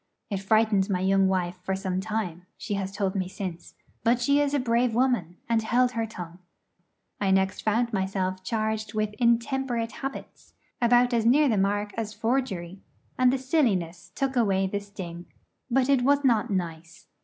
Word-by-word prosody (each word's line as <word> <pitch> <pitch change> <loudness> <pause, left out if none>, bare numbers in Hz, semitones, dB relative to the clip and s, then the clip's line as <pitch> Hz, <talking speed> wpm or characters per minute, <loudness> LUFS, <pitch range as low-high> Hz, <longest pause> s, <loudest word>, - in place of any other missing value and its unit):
It 200 - 0
frightened 210 0 +2
my 180 -2 0
young 195 0 +3
wife 180 -1 -1
for 190 +1 -2
some 190 -1 -2
time, 190 -5 -4
she 215 -1 -4
has 195 -1 -2
told 195 -1 -1
me 185 -2 -1
since; 185 -3 -7 0.3
but 235 +1 +3
she 280 +4 +3
is 290 0 +1
a - - +2
brave 235 -1 +1
woman, 235 -9 +1
and 230 -1 +2
held 245 +3 +2
her 230 -2 -2
tongue. 175 -4 -9 0.8
I 200 - +1
next 190 0 +2
found 230 +2 0
myself 190 -1 -1
charged 215 0 -2
with 215 -1 -1
'intemperate 235 0 +1
habits' 270 0 -8 0.3
about 245 +1 +4
as 230 -2 +2
near 280 +6 +5
the 230 - +2
mark 205 +1 0
as 215 -2 -3
forgery; 205 -6 -2 0.4
and 255 -1 +5
the 270 - +1
silliness 215 - 0
took 270 -1 -1
away 195 -5 +2
the 200 +2 -2
sting. 185 -4 -9 0.4
But 255 +1 +2
it 275 -2 +3
was 285 +3 +3
not 235 -2 +3
nice. 170 -3 -4
215 Hz, 175 wpm, -26 LUFS, 190-245 Hz, 0.8 s, near